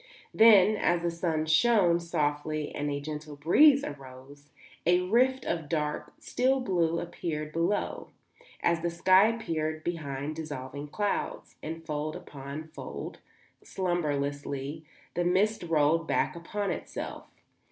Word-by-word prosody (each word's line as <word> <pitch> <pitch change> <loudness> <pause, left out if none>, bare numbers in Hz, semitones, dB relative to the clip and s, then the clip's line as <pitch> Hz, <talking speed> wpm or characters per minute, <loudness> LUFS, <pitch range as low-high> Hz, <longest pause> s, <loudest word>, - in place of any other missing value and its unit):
Then, 215 -2 +7
as 175 -3 +1
the 170 - 0
sun 165 -2 -1
shone 175 +1 +4
softly 155 -2 -2
and 145 0 -2
a 140 0 -2
gentle 150 0 -6
breeze 270 - +5
arose, 140 +1 -10 0.3
a 180 +2 +4
rift 250 +8 +2
of 165 -4 -2
dark, 150 -2 -2
still 265 +2 +1
blue 170 -8 +1
appeared 155 -3 -4
below, 170 +5 -1 0.6
as 170 -1 +2
the 170 - 0
sky 185 +4 +5
appears 160 -9 -2
behind 150 -3 -4
dissolving 145 -2 -6
clouds, 205 +7 -3
and 165 +1 -6
fold 155 0 -3
upon 140 +3 -8
fold, 155 - -7 0.4
slumbrously, 145 -4 -2 0.3
the 175 - 0
mist 195 +5 +2
rolled 165 -1 +2
back - - +1
upon 195 +4 -3
itself. - - -6
165 Hz, 125 wpm, -29 LUFS, 150-180 Hz, 0.6 s, Then